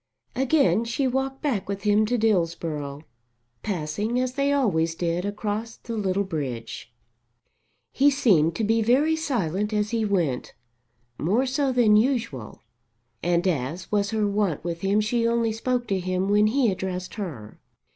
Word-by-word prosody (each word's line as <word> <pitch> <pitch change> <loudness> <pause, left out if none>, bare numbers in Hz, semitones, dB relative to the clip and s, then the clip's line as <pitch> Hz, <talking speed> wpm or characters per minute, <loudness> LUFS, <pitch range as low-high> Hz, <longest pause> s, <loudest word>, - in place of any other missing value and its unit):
Again 245 - +3
she 235 +4 -1
walked 265 +2 -2
back 230 -11 -1
with 200 0 -4
him 210 +1 +3
to 245 +2 +1
Dillsborough, 165 -8 -1 0.6
passing 205 +6 -2
as 255 0 -1
they 280 +1 +1
always 170 -13 +1
did 175 +2 -1
across 210 +2 -3
the 230 - -6
little 200 -2 0
bridge. 135 -11 -5 1.0
He 280 +2 +4
seemed 180 - +3
to 225 - -2
be 225 +2 +2
very 275 +8 +3
silent 210 - -1
as 210 0 0
he 230 -1 0
went, 175 -11 -1 0.6
more 210 - +1
so 270 +1 0
than 235 -4 +4
usual, 225 - -1 0.6
and 175 +2 +1
as 160 +2 -2
was 205 -1 +1
her 215 -1 0
wont 200 -7 0
with 170 0 -4
him 200 +2 +2
she 230 +2 +1
only 230 -1 +1
spoke 245 +2 -1
to 195 -1 +1
him 185 +1 -1
when 210 +1 +4
he 240 -1 +2
addressed 185 -1 -4
her. 155 - -7
210 Hz, 155 wpm, -25 LUFS, 175-235 Hz, 1.0 s, He